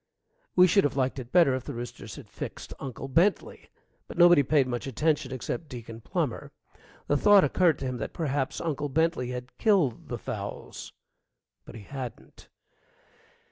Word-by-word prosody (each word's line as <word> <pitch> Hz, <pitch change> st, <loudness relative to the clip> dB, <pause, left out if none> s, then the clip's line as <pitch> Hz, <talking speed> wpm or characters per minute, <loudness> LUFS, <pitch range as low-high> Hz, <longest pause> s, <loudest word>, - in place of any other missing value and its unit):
We 180 Hz, -, +8 dB
should 195 Hz, +3 st, +4 dB
have 145 Hz, -1 st, -1 dB
liked 130 Hz, 0 st, 0 dB
it 125 Hz, -1 st, -9 dB
better 170 Hz, -7 st, +5 dB
if 130 Hz, -1 st, -3 dB
the 145 Hz, -, -6 dB
roosters 120 Hz, +1 st, -7 dB
had -, -, -11 dB
fixed -, -, -7 dB
Uncle 135 Hz, 0 st, -6 dB
Bentley. 170 Hz, +9 st, +1 dB, 0.4 s
But -, -, -10 dB
nobody 175 Hz, -3 st, +7 dB
paid 140 Hz, 0 st, +3 dB
much 120 Hz, 0 st, -4 dB
attention 145 Hz, +1 st, 0 dB
except 130 Hz, +5 st, -4 dB
Deacon 115 Hz, -2 st, -8 dB
Plummer. -, -, -3 dB, 0.5 s
The 145 Hz, -, +2 dB
thought 205 Hz, +3 st, +6 dB
occurred 170 Hz, -6 st, +3 dB
to 135 Hz, -, -5 dB
him 130 Hz, -1 st, -3 dB
that 110 Hz, -, -4 dB
perhaps 145 Hz, -4 st, -2 dB
Uncle 150 Hz, -3 st, -2 dB
Bentley 160 Hz, -3 st, +1 dB
had 125 Hz, 0 st, -7 dB
killed 185 Hz, -, +2 dB
the -, -, -4 dB
fowls. -, -, -7 dB, 0.7 s
But -, -, -11 dB
he 110 Hz, -, -9 dB
hadn't. 130 Hz, 0 st, -9 dB
140 Hz, 165 wpm, -27 LUFS, 125-165 Hz, 0.7 s, We